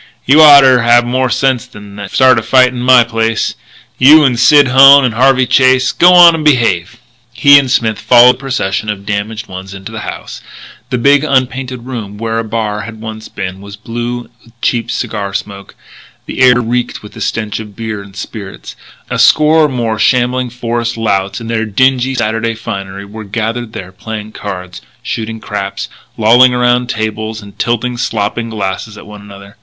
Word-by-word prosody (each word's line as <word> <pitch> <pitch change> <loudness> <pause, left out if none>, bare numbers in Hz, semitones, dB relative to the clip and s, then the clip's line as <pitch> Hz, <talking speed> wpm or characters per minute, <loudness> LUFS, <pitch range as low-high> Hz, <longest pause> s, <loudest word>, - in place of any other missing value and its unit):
"You 145 +4 +5
oughter 140 -4 +7
have 120 +1 +3
more 130 +1 -1
sense 125 +1 -1
than 105 -5 -13
to 100 -1 -7
start 130 0 +3
a - - -4
fight 125 +2 +3
in 125 -1 -8
my 125 -1 +5
place 115 -1 -2 0.5
you 150 +4 +7
and 125 -4 +1
Sid 145 -1 +5
Hone 135 +2 +7
and 120 - -1
Harvey 130 +2 +2
Chase. 130 0 +2
G'wan 175 0 +7
in 165 - 0
and 155 - -5
behave." 120 - +1 0.4
He 140 +2 +6
and 135 -2 -3
Smith 115 -4 0
followed 125 0 +5
the - - -15
procession 110 -7 -3
of 100 -1 -5
damaged 105 +2 -4
ones 95 0 -9
into 95 +3 -10
the 110 - -7
house. - - -8 0.5
The 125 - -1
big 140 +4 +3
unpainted 130 -3 -2
room 110 -6 -7
where 115 +1 -3
a - - -2
bar 110 -1 -3
had 110 +1 -10
once 110 0 -8
been 95 0 -7
was 100 0 -11
blue 120 +3 -5 0.2
with 115 0 -24
cheap 115 -1 -2
cigar 100 -4 -4
smoke; 100 -1 -7 0.5
the - - -7
air 125 -1 +5
reeked 120 0 -3
with 105 - -12
the - - -11
stench 110 -2 -3
of 105 -2 -10
beer 110 -2 -6
and 100 -1 -15
spirits. 100 -1 -9 0.4
A - - -2
score 155 +1 +4
or - - -1
more 115 -4 -3
shambling 125 0 +1
forest 120 -1 -4
louts 100 -3 -2
in 115 - -9
their 115 0 -2
dingy 130 +4 +1
Saturday 115 -1 -2
finery 100 -3 -7
were 110 +2 -10
gathered 115 +2 -4
there 95 -1 -8
playing 110 +3 -8
cards, 90 -4 -8 0.2
shooting 110 0 -5
craps, 100 -2 -5 0.3
lolling 120 +3 +4
around 125 0 +1
tables 110 0 -4
and 100 0 -15
tilting 120 +1 -2
slopping 115 0 -3
glasses 105 0 -5
at - - -12
one 105 -1 -12
another. 100 0 -14
115 Hz, 185 wpm, -12 LUFS, 105-125 Hz, 0.5 s, oughter